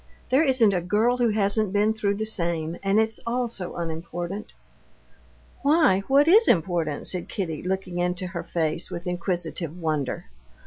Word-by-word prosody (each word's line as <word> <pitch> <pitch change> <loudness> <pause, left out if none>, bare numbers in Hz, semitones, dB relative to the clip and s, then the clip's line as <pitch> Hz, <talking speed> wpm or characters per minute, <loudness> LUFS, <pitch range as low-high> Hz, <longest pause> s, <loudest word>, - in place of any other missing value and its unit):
"There 265 +3 +5
isn't 255 -8 +4
a 180 - 0
girl 215 +7 +1
who 240 -2 +2
hasn't 210 -1 +1
been 210 +2 +2
through 205 -2 -1
the 215 +2 -3
same. 170 -6 -1
And 195 +2 +2
it's 220 0 0
all 245 +1 0
so 190 -6 -4
unimportant." 170 +4 -5 1.1
"Why, 285 - +4
what 280 +3 +4
is 430 +7 +6
important?" 165 -4 +1
said 180 -2 -2
Kitty, 165 -7 -3
looking 185 -1 -3
into 180 +1 -1
her 175 -1 -5
face 165 0 -2
with 170 +1 -6
inquisitive 175 -2 -3
wonder. 155 -5 -2
190 Hz, 160 wpm, -25 LUFS, 170-220 Hz, 1.1 s, is